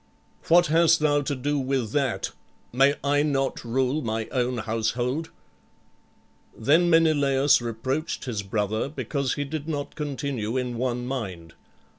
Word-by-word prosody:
"What 175 +1 +6
hast 165 +1 +4
thou 145 -1 +2
to 140 0 -2
do 145 +3 -1
with 130 -4 -1
that? 135 -4 -1 0.4
May 135 +3 +4
I 145 +1 +2
not 135 -2 -1
rule 130 +5 0
my 110 -3 -2
own 125 -1 -1
household?" 120 +7 -1 1.3
Then 160 +9 +3
Menelaüs 145 -5 +4
reproached 130 +9 -3
his 115 -5 -3
brother 105 +4 -2
because 140 -3 -2
he 145 - -2
did 150 +1 -5
not 145 -3 -3
continue 140 -6 -3
in 125 -2 -2
one 125 -1 -1
mind. 95 -11 -5
135 Hz, 135 wpm, -25 LUFS, 120-145 Hz, 1.3 s, What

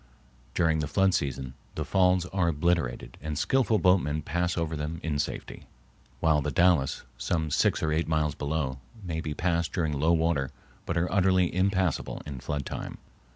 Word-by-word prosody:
During 80 -2 +2
the 75 - -1
flood 95 +4 +3
season 65 -4 -2 0.2
the - - -2
falls 90 -2 +3
are 90 -3 +2
obliterated 85 -4 0
and 75 0 -4
skillful 125 - +2
boatmen 90 -6 +2
pass 85 +3 -1
over 80 -1 -1
them 75 +2 -4
in 75 -3 -1
safety; - - -4 0.5
while 80 -2 +3
the 75 - -1
Dalles, 85 -2 +3 0.2
some 80 -3 -1
six - - +2
or 80 - +1
eight 80 +2 0
miles 80 -2 +1
below, 70 -4 -2 0.2
may 80 -3 -3
be 75 -2 -4
passed 85 0 0
during 80 -5 0
low 75 +4 +2
water 80 -5 +1 0.4
but 85 - -1
are 85 +2 0
utterly 95 -2 +3
impassable 95 -1 0
in 70 -3 -6
flood 70 +1 -3
time. - - -5
80 Hz, 170 wpm, -28 LUFS, 75-90 Hz, 0.5 s, flood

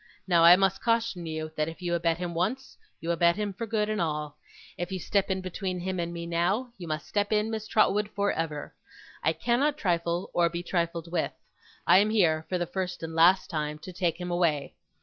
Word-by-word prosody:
Now 170 -2 +4
I 170 +1 +10
must 195 0 +1
caution 230 -7 0
you 155 0 -4
that 155 0 0
if 165 - -10
you 175 -1 -2
abet 170 -1 +1
him 175 -1 -4
once, 215 +11 -2 0.3
you 165 - -1
abet 170 0 +3
him 210 -1 -2
for 225 +4 -5
good 210 -1 0
and 215 -3 -1
all; 150 -2 -3 0.4
if 175 +1 -4
you 190 - -2
step 195 +2 0
in 190 0 -1
between 185 0 -4
him 185 +1 -3
and 170 0 -2
me, 170 0 -5
now, 185 +9 0
you 175 - -7
must 155 0 -3
step 205 0 -1
in, 215 +1 +1
Miss 220 -1 -4
Trotwood, 210 -1 +2
for 200 0 +1
ever. 155 -3 -4 0.5
I - - +3
cannot 280 +5 +1
trifle, 170 - -1
or 170 -1 +3
be 170 +1 -5
trifled 170 -2 -2
with. 170 -2 -1 0.5
I 185 - +7
am 210 +2 +3
here, 165 -7 +2
for 185 - 0
the 175 - -1
first 180 -1 -4
and 165 0 -5
last 175 +4 +4
time, 150 -2 -2
to 165 +4 -10
take 175 -2 -1
him 180 0 -4
away. 155 -6 0
175 Hz, 220 wpm, -28 LUFS, 165-200 Hz, 0.5 s, I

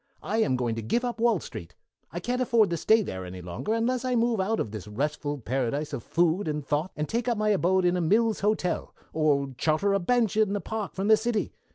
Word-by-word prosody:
I'm 210 -6 +1
going 120 -2 -1
to - - -2
give 235 - 0
up 240 -2 -3
Wall 230 -4 +3
Street. 85 - -9 0.4
I 175 - -4
can't 245 +7 -2
afford 230 -6 +3
to - - +1
stay 220 +7 +4
there 95 - -5
any 90 0 -8
longer 90 - -3
unless 240 +2 0
I 255 -1 0
move 230 -2 +2
out 220 +4 0
of 105 - -2
this 105 -3 -7
restful 145 +6 -2
paradise 135 +4 -2
of 135 - -3
food 170 - +1
and 150 -2 -3
thought 150 +5 0
and 150 0 -2
take 235 +2 -2
up 235 -2 +1
my 215 0 +1
abode 190 -2 +2
in 175 0 +3
a 180 - 0
Mills 215 +6 +2
Hotel, 205 -3 -1 0.2
or 140 -3 +1
charter 165 +6 +2
a 200 - +2
bench 225 +2 +1
in 215 -2 +2
the 205 - 0
park 215 0 -5
from 195 +1 -1
the 220 0 +7
city. 220 0 -1
190 Hz, 235 wpm, -27 LUFS, 145-220 Hz, 0.4 s, the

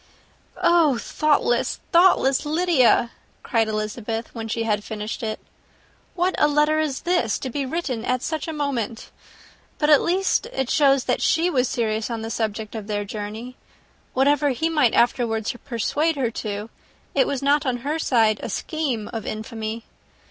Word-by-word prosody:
"Oh, 325 -7 +4
thoughtless, 285 -2 +1
thoughtless 340 -7 +4
Lydia!" 300 -7 +3 0.3
cried 225 -2 +1
Elizabeth 215 +1 -3
when 225 -2 -5
she 230 +1 -2
had 210 -2 0
finished 215 0 -5
it. 220 -1 -3 0.8
"What 365 +1 +1
a 295 - +5
letter 300 +1 +2
is 300 -4 -1
this, 345 - +1
to 260 - -5
be 275 +1 -2
written 260 -6 -3
at 255 0 -1
such 315 -1 -3
a - - -2
moment! 270 -7 -3 0.7
But 300 0 +2
at 295 - +7
least 385 +6 +1
it 265 - -3
shows 275 -3 +4
that - - 0
she 335 +2 +2
was 255 -4 +1
serious 220 -1 -1
in 230 -2 -4
the 225 - -4
object 215 0 -4
of 215 -3 -6
her 205 -1 -2
journey. 215 +5 -6 0.6
Whatever 285 +2 +3
he 315 +5 0
might 295 -8 +2
afterwards 230 -2 +1
persuade 290 +6 0
her 255 -5 -1
to, 210 -1 -5 0.4
it - - +3
was 275 -1 -2
not 285 +1 +3
on 250 -1 0
her 305 +3 -1
side 225 -7 +2
a - - -5
scheme 275 - -2
of 225 -2 -5
infamy. 220 +1 -5
250 Hz, 165 wpm, -23 LUFS, 225-300 Hz, 0.8 s, at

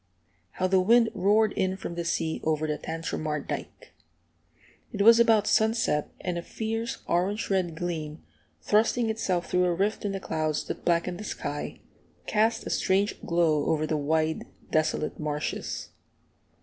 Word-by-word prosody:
How 185 - -1
the 185 0 +4
wind 230 +4 +4
roared 205 +3 +3
in 190 0 0
from 180 - -6
the 170 0 -3
sea 165 -1 -1
over 155 0 0
the 150 -1 -2
Tantramar 155 -2 -3
dike! - - -7 1.0
It 205 -4 0
was 230 +2 +8
about 225 -3 +5
sunset, 220 -10 +2
and 175 -2 -2
a - - -4
fierce 225 +5 -4
orange 195 +5 0
red 180 -4 0
gleam, 160 -3 -4 0.4
thrusting 220 +2 +2
itself 185 -5 -1
through 180 0 +2
a 175 -1 +1
rift 205 +6 0
in 205 - -1
the 195 - -3
clouds 155 -4 -1
that - - -6
blackened 175 +1 +1
the - - -6
sky, - - -5 0.4
cast 220 +2 +1
a - - -4
strange 195 +2 +1
glow 165 -4 +2
over 155 -1 +1
the 155 - -1
wide, 155 +2 0 0.2
desolate 155 -1 0
marshes. 150 -1 -3
180 Hz, 155 wpm, -27 LUFS, 160-210 Hz, 1.0 s, was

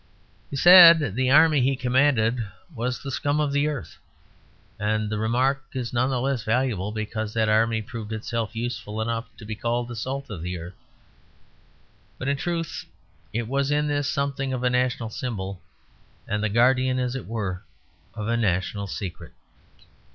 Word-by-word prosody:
He - - -6
said 170 - +8
the 130 +3 +1
army 155 0 +6
he 135 +2 +2
commanded 125 -2 +2 0.3
was 125 0 -3
the 140 - -5
scum 145 +3 0
of 150 -2 +1
the 145 +1 +1
earth; 145 -5 -5 0.8
and 105 0 -1
the 105 - -2
remark 130 +5 +1
is 125 -3 -4
none 125 +2 +2
the 130 -2 0
less 135 -1 -1
valuable 110 -4 0
because 110 0 -4
that 110 -1 +2
army 110 +1 +2
proved 110 -1 -7
itself 110 0 -3
useful 110 -2 -4
enough 115 +1 -2
to 110 - -11
be 110 - -4
called 120 +2 -2
the 120 - -7
salt 130 +3 -4
of 90 -6 -6
the 90 +1 -4
earth. 85 +3 -8 1.4
But 130 - -3
in 140 - +1
truth 165 +1 -3 0.5
it 115 0 -2
was 140 +2 0
in 150 0 +1
this 145 -1 0
something 140 -1 -2
of 125 -1 -3
a 125 - +2
national 125 -2 0
symbol 100 -6 -5 0.7
and 105 +1 -1
the 110 - +1
guardian, 130 +3 +3
as 125 0 -1
it 135 - -6
were, 100 -5 -3 0.5
of 105 0 -4
a 115 - +1
national 100 -2 -1
secret. 95 -1 -7
120 Hz, 170 wpm, -25 LUFS, 110-135 Hz, 1.4 s, said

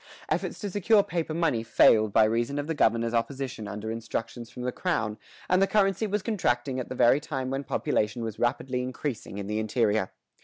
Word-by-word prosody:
Efforts - - -1
to 205 -2 -5
secure 205 +2 +4
paper 165 -3 -3
money 160 -9 +1
failed 110 -1 +4
by 110 - +5
reason 115 +5 0
of 145 - -2
the 165 - -2
governor's 115 -5 +2
opposition 120 -2 -2
under 105 +2 -5
instructions 115 +1 -5
from 125 - -8
the 125 - -1
crown, 115 - -1 0.3
and 185 +1 +3
the 195 - +4
currency 195 +1 +2
was 205 -1 -1
contracting 130 - 0
at 125 - -5
the 130 - -5
very 120 +3 +5
time 135 -4 -4
when 135 +1 -2
population 110 -2 -1
was 110 -2 -5
rapidly 125 +1 0
increasing 125 -4 -5
in 100 - -4
the 105 +2 -2
interior. 110 -2 +1
125 Hz, 195 wpm, -27 LUFS, 115-160 Hz, 0.3 s, by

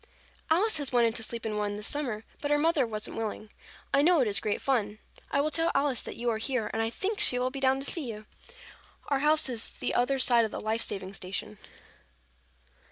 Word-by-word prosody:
"Alice 370 +5 +3
has 285 -3 -2
wanted 235 -2 +3
to 230 - -1
sleep 230 +1 -5
in 215 -1 -2
one 205 -1 -1
this 210 0 -5
summer, 245 -7 -2 0.2
but 290 - -2
her 295 - +4
mother 300 -4 +2
wasn't 215 -1 -4
willing. 215 -1 -4 0.4
I 280 - +5
know 340 +2 +5
it 255 - +3
is 200 -1 +4
great 210 0 -1
fun. 215 -6 0 0.3
I 280 - +1
will 305 +2 0
tell 330 +2 +1
Alice 275 -3 +2
that - - -7
you 240 - -4
are 220 - -2
here 250 -1 -1
and 225 - 0
I 225 - 0
think 400 - -3
she 255 -11 +4
will 250 +1 0
be 275 - -5
down 265 0 +3
to - - -6
see 280 -6 -2
you. 215 0 -9 0.8
Our 280 -2 +2
house 305 +1 +4
is 235 -3 -6
the - - -2
other 260 +3 +2
side 240 -3 +4
of 220 - -1
the - - -5
life 220 +1 -1
saving 195 -1 -2
station." 185 - -5
245 Hz, 230 wpm, -29 LUFS, 215-285 Hz, 0.8 s, I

